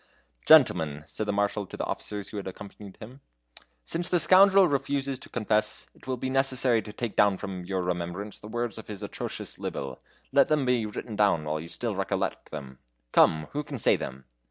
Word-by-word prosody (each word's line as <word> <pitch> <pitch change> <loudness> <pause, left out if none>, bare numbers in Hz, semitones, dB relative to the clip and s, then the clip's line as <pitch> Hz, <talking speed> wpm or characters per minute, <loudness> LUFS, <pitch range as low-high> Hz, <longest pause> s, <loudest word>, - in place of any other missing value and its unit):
"Gentlemen," 75 -2 +5
said 75 +9 -4
the - - +1
Marshal 100 0 0
to - - -9
the - - -2
officers 105 -1 -5
who 105 - -7
had 100 - -5
accompanied 100 +1 -10
him, 125 +6 -12 0.6
"since 170 - -2
the 175 - +3
scoundrel 195 +1 +6
refuses 140 -2 -1
to - - -12
confess, 110 -2 -1
it - - -19
will 130 -1 -1
be 130 - -3
necessary 130 -3 +2
to 105 - -9
take 115 0 -4
down 100 -2 +4
from 95 -3 -6
your 95 0 -2
remembrance 90 +3 -4
the 105 - -10
worlds 120 0 -3
of - - -11
his 105 -1 -7
atrocious 100 - -6
libel. 65 -2 -5 0.3
Let 140 0 +5
them 150 -3 +2
be 125 -3 +1
written 105 +1 -6
down 100 -7 +3
while 75 +1 -2
you 80 - -7
still - - -3
recollect - - -2
them. 65 -4 -8 0.3
Come, 80 -1 +4
who 150 +1 -2
can 140 -2 -6
say - - +3
them?" 65 0 -6
105 Hz, 200 wpm, -27 LUFS, 90-130 Hz, 0.6 s, scoundrel